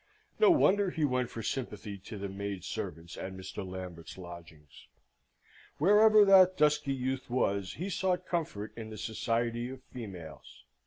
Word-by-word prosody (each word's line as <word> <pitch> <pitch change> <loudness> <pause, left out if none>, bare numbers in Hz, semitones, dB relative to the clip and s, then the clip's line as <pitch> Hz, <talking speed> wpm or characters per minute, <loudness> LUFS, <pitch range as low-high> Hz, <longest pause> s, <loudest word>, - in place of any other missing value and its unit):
No 435 - +7
wonder 205 - +4
he 160 -4 0
went 125 -3 0
for 115 - -6
sympathy 105 -6 -4
to 100 +3 -9
the 100 0 -4
maid 100 -1 -5
servants 85 -7 -6
at 95 - -5
Mr. 95 +1 -6
Lambert's 90 -3 -8
lodgings. 85 -4 -12 0.9
Wherever 210 +5 +6
that 185 -1 +7
dusky 150 -1 +3
youth 130 0 -3
was, 100 -6 0
he 180 - -4
sought 185 -1 0
comfort 150 - -3
in 110 -1 -7
the 110 - -8
society 115 +2 -1
of 130 0 -9
females. 90 - -9
115 Hz, 150 wpm, -31 LUFS, 95-150 Hz, 0.9 s, No